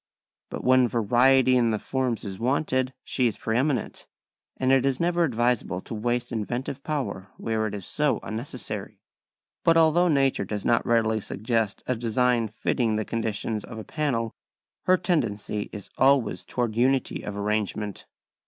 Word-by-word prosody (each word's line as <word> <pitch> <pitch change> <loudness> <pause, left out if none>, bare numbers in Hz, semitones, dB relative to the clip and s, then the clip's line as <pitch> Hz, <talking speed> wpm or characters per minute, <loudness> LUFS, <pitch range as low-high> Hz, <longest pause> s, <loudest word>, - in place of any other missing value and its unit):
But - - -6
when 130 -1 +5
variety 125 +3 +4
in 120 -2 +3
the 110 - +1
forms 125 0 -2
is 95 -2 -6
wanted, 130 +1 0
she 125 -2 +1
is 110 - -3
pre 110 - -2
eminent, 130 -1 -1 0.5
and 130 0 +1
it 135 -1 +4
is 135 -1 +1
never 175 0 +2
advisable 120 - 0
to - - -8
waste 120 +3 -1
inventive 125 +5 -3
power 105 -11 -3
where 110 -1 -1
it 105 - -5
is 100 -3 -6
so 150 -2 +1
unnecessary. 115 +5 -5 0.6
But 165 0 +5
although 165 +2 +5
nature 135 -4 +2
does 105 -2 -4
not 115 - +3
readily 110 -2 +2
suggest 110 0 -2
a 125 - 0
design 120 0 +1
fitting 110 +1 0
the 110 0 -1
conditions 110 -1 -2
of 115 - -9
a 110 - -6
panel 125 -7 -1 0.5
her 185 0 +5
tendency 110 - -1
is 105 -3 -9
always 130 -9 +3
towards 120 -3 -2
unity 130 +2 +1
of 105 -1 -6
arrangement. 105 0 -2
120 Hz, 160 wpm, -26 LUFS, 110-130 Hz, 0.6 s, when